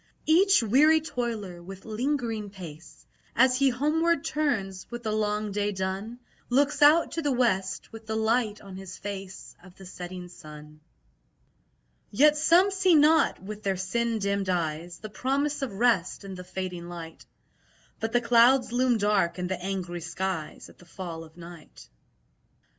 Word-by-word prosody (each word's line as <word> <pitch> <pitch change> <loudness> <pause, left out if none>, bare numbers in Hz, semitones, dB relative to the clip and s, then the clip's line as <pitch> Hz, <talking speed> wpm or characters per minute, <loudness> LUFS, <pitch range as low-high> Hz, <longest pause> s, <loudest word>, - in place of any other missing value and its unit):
Each 370 - +5
weary 295 +9 +5
toiler, 230 - -4
with 195 +2 -11
lingering 225 -2 -2
pace, 170 -5 -12 0.3
As 255 +1 +4
he 275 0 +4
homeward 305 +5 +1
turns, 210 -12 -2
with 240 0 -7
the 215 - -2
long 210 0 -1
day 205 +1 -1
done, 190 +4 -4 0.3
Looks 280 +4 +2
out 300 +3 +6
to 330 - -2
the 290 -2 0
west, 195 -7 0
with 225 -1 -11
the 220 - -2
light 220 -1 0
on 195 -2 -10
his 190 -1 -9
face 195 -2 -8
Of 185 -1 -16
the 195 - -13
setting 180 0 -8
sun. 150 -3 -13 1.3
Yet 295 +8 +5
some 340 +6 +4
see 380 -3 +3
not 300 - +4
(with 210 +2 -7
their 195 -2 -1
sin 230 +5 -1
dimmed 200 -2 -1
eyes) 170 -1 -2
The 215 - -9
promise 280 +5 -1
of 270 - -2
rest 200 -3 +1
in 195 -1 -7
the 180 -1 -8
fading 180 -1 -6
light; 165 -2 -9 0.8
But 225 - -2
the 240 - +2
clouds 245 +2 +4
loom 245 -1 +2
dark 205 -4 +1
in 180 - -3
the 180 0 -3
angry 180 -3 -4
skies 175 -1 -4
At - - -19
the 175 - -16
fall 170 -2 -7
of 160 +1 -16
night. 170 - -12
210 Hz, 160 wpm, -27 LUFS, 185-250 Hz, 1.3 s, out